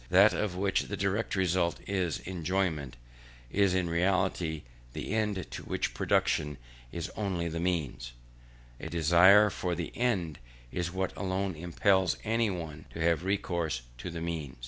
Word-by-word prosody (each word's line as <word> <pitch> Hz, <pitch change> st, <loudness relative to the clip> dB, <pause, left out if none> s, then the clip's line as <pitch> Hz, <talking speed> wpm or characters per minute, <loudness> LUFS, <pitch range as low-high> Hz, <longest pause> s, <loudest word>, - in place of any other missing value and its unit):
that 100 Hz, +4 st, +6 dB
of 105 Hz, -4 st, -1 dB
which 95 Hz, +1 st, 0 dB
the 100 Hz, -, -4 dB
direct 100 Hz, +4 st, 0 dB
result 90 Hz, -2 st, +1 dB
is 95 Hz, -5 st, -1 dB
enjoyment, 85 Hz, -7 st, -1 dB, 0.5 s
is 100 Hz, -2 st, +3 dB
in 90 Hz, -2 st, +1 dB
reality 85 Hz, -2 st, 0 dB, 0.3 s
the -, -, -4 dB
end, 105 Hz, -5 st, 0 dB
to -, -, -5 dB
which -, -, -2 dB
production 75 Hz, -1 st, +1 dB, 0.3 s
is 85 Hz, -2 st, -4 dB
only 95 Hz, -5 st, -1 dB
the 85 Hz, 0 st, -3 dB
means; 70 Hz, -9 st, -2 dB, 0.7 s
and -, -, -6 dB
a -, -, -6 dB
desire 85 Hz, +6 st, +6 dB
for 90 Hz, -1 st, -2 dB
the 85 Hz, -1 st, -5 dB
end, 95 Hz, -, 0 dB, 0.3 s
is 85 Hz, -1 st, -2 dB
what 95 Hz, +1 st, -2 dB
alone 95 Hz, -1 st, -2 dB
impels 90 Hz, +2 st, +2 dB
any 115 Hz, 0 st, +1 dB
one 80 Hz, -5 st, -6 dB
to -, -, -8 dB
have 85 Hz, 0 st, +2 dB
recourse 85 Hz, -9 st, -1 dB, 0.2 s
to 90 Hz, -, -5 dB
the 85 Hz, -1 st, -5 dB
means. 80 Hz, -5 st, -4 dB
90 Hz, 155 wpm, -30 LUFS, 80-95 Hz, 0.7 s, that